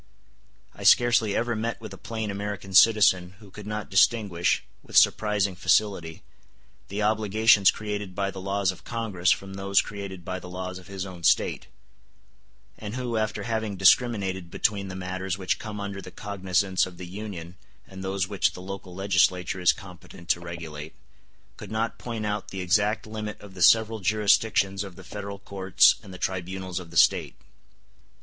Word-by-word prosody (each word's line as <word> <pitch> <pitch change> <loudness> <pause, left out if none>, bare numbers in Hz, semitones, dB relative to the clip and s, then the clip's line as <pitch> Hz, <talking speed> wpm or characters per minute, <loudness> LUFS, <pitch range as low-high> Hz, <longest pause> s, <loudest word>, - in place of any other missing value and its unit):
I - - -14
scarcely 115 -4 +4
ever 120 0 0
met 115 +2 -3
with 110 -3 -9
a - - -7
plain 110 -2 -4
American 100 -1 -5
citizen 100 -4 +5
who 100 -1 -16
could 105 +1 -10
not 105 0 -4
distinguish, 95 -3 +2 0.2
with - - -3
surprising 105 -3 +3
facility, 95 -3 +1 0.6
the 105 +2 -3
obligations 110 -1 +4
created 105 -3 -4
by 100 0 -1
the 95 - -8
laws 100 0 0
of 90 - -14
Congress 110 -7 0
from 95 0 -2
those 100 0 +2
created 100 -4 -5
by 95 0 -4
the 90 - -10
laws 90 0 -6
of 90 - -16
his 95 -1 -5
own 90 -2 -9
State; - - +2 1.1
and 105 +1 -6
who, 125 -2 -3
after 110 -1 -1
having 110 -2 -2
discriminated 95 -3 +3
between 100 +2 0
the 95 - -7
matters 95 0 -4
which 95 -1 -1
come 105 -1 -6
under 100 -1 -5
the 95 - -10
cognizance 95 -1 0
of 90 -2 -12
the 90 - -7
Union 90 -2 -7 0.3
and 95 0 -10
those 95 0 -1
which 100 -1 0
the - - -9
local 95 -1 -8
legislature 95 -1 +1
is 90 - +5
competent 90 -2 -12
to - - +3
regulate, 80 -3 -8 0.6
could 105 - -9
not 110 +1 -2
point 115 -3 -4
out 105 -1 -2
the 95 - -6
exact 105 +4 +1
limit 110 -1 -6
of 100 -2 -13
the 95 - -9
several 110 +2 +5
jurisdictions 100 -1 +2
of 95 -3 -10
the 95 - -12
Federal 100 +1 -7
courts 95 -1 +3
and 95 - -13
the 90 - -8
tribunals 95 0 -3
of 90 -2 -10
the 85 - -6
State. - - +4
100 Hz, 170 wpm, -26 LUFS, 95-105 Hz, 1.1 s, citizen